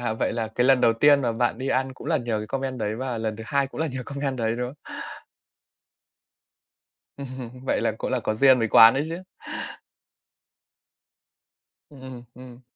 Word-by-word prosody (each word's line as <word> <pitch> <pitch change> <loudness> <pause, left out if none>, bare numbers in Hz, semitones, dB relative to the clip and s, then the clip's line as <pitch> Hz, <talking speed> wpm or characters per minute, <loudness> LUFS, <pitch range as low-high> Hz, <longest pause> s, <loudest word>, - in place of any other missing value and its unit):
à, 120 -2 -1
vậy - - -1
là 115 -2 -2
cái 125 +2 0
lần 135 -2 +5
đầu 115 - +4
tiên 140 +4 +4
mà 120 -2 0
bạn 120 0 0
đi 135 +1 -3
ăn 130 0 0
cũng - - -11
là - - +2
nhờ 115 -3 -2
cái 105 - -5
comment 135 +1 -3
đấy 105 0 -2
và 125 -2 -3
lần 110 -1 -3
thứ 110 - -8
hai 140 -1 +1
cũng 140 - -8
là 160 - +1
nhờ 130 -3 -5
comment 140 -2 -3
đấy, 115 0 -1
đúng 125 0 -2
không? 135 - -11 2.4
Ừm, 130 -3 -7
vậy - - 0
là - - 0
cũng - - -3
là - - 0
có 110 - -1
duyên 130 +3 +5
với 115 -1 0
quán 115 +1 +8
đấy 140 +3 0
chứ. 170 +3 -6 2.7
Ừm, 140 -3 -14
ừm, 130 -2 -9
ừm. 125 -1 -13
125 Hz, 200 wpm, -24 LUFS, 115-135 Hz, 2.7 s, quán